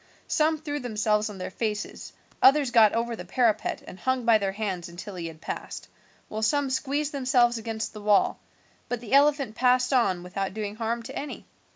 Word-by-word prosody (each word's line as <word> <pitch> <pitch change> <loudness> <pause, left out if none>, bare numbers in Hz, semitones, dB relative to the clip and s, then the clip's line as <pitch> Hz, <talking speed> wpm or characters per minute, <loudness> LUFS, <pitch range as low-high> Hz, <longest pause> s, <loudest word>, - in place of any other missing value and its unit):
Some 315 +1 +2
threw 295 -1 -4
themselves 215 -3 0
on 205 - -8
their 185 0 -5
faces, 210 0 -4 0.3
others 275 -1 +5
got 220 -3 +6
over 230 +1 -1
the 180 - -7
parapet 220 +4 0
and 185 - -11
hung 260 -2 0
by 230 -2 +5
their 195 -1 -1
hands 190 -4 -3
until 180 +4 -8
he 175 -2 -5
had 160 -1 -11
passed, - - -6 0.4
while 215 - -5
some 275 +5 +1
squeezed 285 +3 -1
themselves 250 -4 +2
against 225 0 -4
the 210 - -9
wall; 205 -1 +3 0.5
but 245 - -2
the 230 0 -7
elephant 280 -4 +4
passed 250 +2 +2
on 190 -9 +2
without 190 +2 -4
doing 210 -1 -4
harm 230 +1 -2
to - - -8
any. 290 - -6
225 Hz, 190 wpm, -26 LUFS, 210-260 Hz, 0.5 s, got